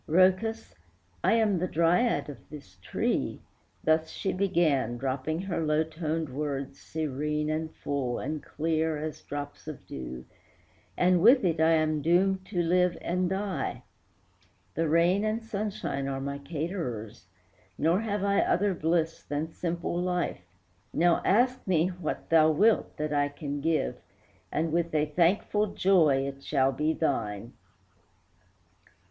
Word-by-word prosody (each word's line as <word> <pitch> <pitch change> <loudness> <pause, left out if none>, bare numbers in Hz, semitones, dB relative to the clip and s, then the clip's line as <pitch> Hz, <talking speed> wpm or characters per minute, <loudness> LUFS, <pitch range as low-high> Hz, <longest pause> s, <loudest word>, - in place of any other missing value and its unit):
"Rhœcus, 190 +7 +2 0.5
I - - +4
am 215 -5 +2
the 180 - 0
Dryad 175 +9 +2
of 140 -5 -11
this 115 -12 -12
tree," 90 - -1 0.4
Thus 160 0 +2
she 195 - -3
began, 155 - +1
dropping 135 +5 -2
her 185 -4 -2
low 155 0 +2
toned 160 0 -3
words 140 0 -4
Serene, 150 0 -2
and 160 +1 -2
full, 135 -4 -3
and 155 -1 -4
clear, 160 +1 -1
as 155 0 -5
drops 145 +1 -7
of 145 -11 -8
dew, 65 -5 -7 0.7
"And 180 -1 +4
with 240 +2 +6
it 165 -3 +1
I 160 +1 +5
am 155 -1 +1
doomed 185 +4 +2
to 175 -4 -1
live 180 +1 +2
and 180 +1 -1
die; 195 0 -3 0.9
The 165 0 0
rain 170 +5 +3
and 215 +1 -1
sunshine 200 -10 -3
are 135 -1 -2
my 140 +1 -4
caterers, 140 - -5 0.5
Nor 165 +5 +2
have 210 -2 -2
I 200 0 +2
other 200 +2 +2
bliss 165 -1 0
than 150 +2 -3
simple 170 0 -2
life; 180 - -1 0.5
Now 175 0 +3
ask 245 +5 +2
me 175 -1 +3
what 175 -4 -5
thou 160 -1 +6
wilt, 205 +8 +2
that 150 0 -2
I 145 -1 +2
can 145 0 -5
give, 155 - 0 0.5
And 160 +1 0
with 170 0 0
a 150 0 +3
thankful 180 +7 +2
joy 155 -8 +4
it 140 0 -6
shall 135 -2 +2
be 150 +4 0
thine." 115 -8 -2
160 Hz, 140 wpm, -28 LUFS, 145-180 Hz, 0.9 s, with